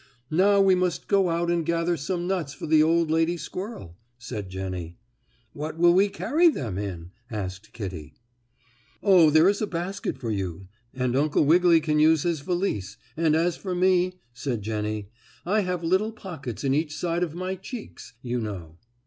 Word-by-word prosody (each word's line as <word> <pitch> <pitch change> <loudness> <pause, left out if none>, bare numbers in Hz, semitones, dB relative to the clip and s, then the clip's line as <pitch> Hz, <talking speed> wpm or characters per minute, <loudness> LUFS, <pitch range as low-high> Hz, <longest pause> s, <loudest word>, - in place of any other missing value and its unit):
"Now 200 +5 +4
we 195 -1 +5
must 180 -2 0
go 195 -2 +3
out 170 +1 0
and 170 -1 +1
gather 170 +1 0
some 175 +4 -3
nuts 175 -7 -2
for - - -7
the 155 0 +4
old 165 0 +3
lady 165 +2 +2
squirrel," 185 - -7 0.2
said 110 -5 -6
Jennie. 95 -3 -5 0.6
"What 155 +2 -5
will 175 +1 +5
we 195 +3 +4
carry 315 - +3
them 115 - -3
in?" 90 -4 -6 0.2
asked 105 -1 -6
Kittie. 90 -9 -7 0.9
"Oh, 185 -6 +6
there 155 +3 +5
is 200 +2 +2
a 215 - 0
basket 180 +2 -4
for 115 -3 -4
you, 95 -2 -4 0.2
and 125 -1 -1
Uncle 150 +1 +2
Wiggily 170 +1 +5
can 150 -1 +1
use 155 0 +4
his 170 -3 0
valise, 160 - -2 0.2
and 160 -1 +2
as 170 +2 +1
for 185 -2 -4
me," 185 0 +3 0.2
said 120 -4 -3
Jennie, 105 -1 -3 0.3
"I 205 +5 +2
have 180 -3 -2
little 190 +6 +1
pockets 145 - -7
in 135 -1 +2
each 150 +1 -1
side 170 0 -1
of 165 -3 -2
my 185 +1 -3
cheeks, 190 - -9
you 125 0 -2
know." 90 -7 -6
160 Hz, 175 wpm, -25 LUFS, 110-180 Hz, 0.9 s, Oh